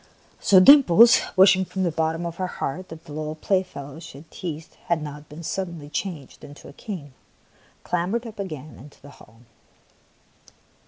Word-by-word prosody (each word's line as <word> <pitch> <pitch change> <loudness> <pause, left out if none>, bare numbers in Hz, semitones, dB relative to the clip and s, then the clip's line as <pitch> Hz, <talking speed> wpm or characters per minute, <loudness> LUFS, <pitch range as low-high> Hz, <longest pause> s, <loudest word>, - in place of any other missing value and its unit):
So 190 - +5
Dimples, 235 - +7
wishing 190 0 +6
from 190 +1 -4
the 175 - 0
bottom 160 +2 -2
of 170 -1 -6
her 185 - -2
heart 180 +2 -5
that 160 0 -11
the 150 - -10
little 155 0 -5
playfellow 160 -5 -3
she 160 -4 -11
had 155 +3 -16
teased 160 -3 -7
had 170 -2 +1
not 150 -1 -9
been 155 +3 -10
suddenly 170 -4 -5
changed 155 -3 -6
into 145 +1 -12
a - - -12
king, 150 -7 -8 0.7
clambered 185 +7 -2
up 220 -2 -10
again 155 -6 -7
into 145 +4 -15
the 145 - -14
hall. 115 -3 -19
165 Hz, 165 wpm, -23 LUFS, 150-185 Hz, 0.7 s, Dimples